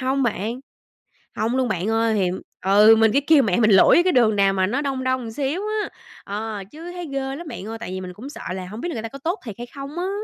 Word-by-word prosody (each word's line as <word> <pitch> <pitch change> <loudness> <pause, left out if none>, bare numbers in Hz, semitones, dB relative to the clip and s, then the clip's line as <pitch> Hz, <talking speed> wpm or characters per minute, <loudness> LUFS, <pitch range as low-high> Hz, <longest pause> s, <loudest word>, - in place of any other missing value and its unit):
hông 265 +1 0
bạn, 230 +1 -2 0.8
hông 230 +4 0
luôn 255 -2 +1
bạn 185 -1 -2
ơi, 225 0 +2
thì 190 -3 +2 0.4
ừ, 210 +3 +7
mình 225 -1 +4
cứ 275 - +3
kêu 310 -4 +6
mẹ 195 -5 +1
mình 220 -1 +4
lủi 195 - +7
cái 365 0 +2
đường 225 -4 +4
nào 195 -1 +4
mà 190 -1 +1
nó 255 +9 -1
đông 265 -2 -2
đông 255 -3 -1
xíu 285 +7 -2 0.2
á, - - -4 0.4
ờ, 210 0 -4
chứ 335 +3 -9
thấy 355 -2 -6
ghê 275 - -1 0.2
lắm 340 +1 -8
bạn 195 - -7
ơi, 225 +1 -6
tại - - -6
vì 185 - -4
mình 180 -1 -7
cũng 240 +9 -9
sợ 290 - -10
là 185 -1 -5
hổng 210 +5 -8
biết 350 - -3
là 335 - -4
người 225 - -4
ta 225 - -4
có 275 +5 -10
tốt 340 +9 -2
thiệt 220 -5 -6
hay 240 - -6
không 280 +4 -7
á. 370 +2 -1
230 Hz, 275 wpm, -22 LUFS, 210-275 Hz, 0.8 s, ừ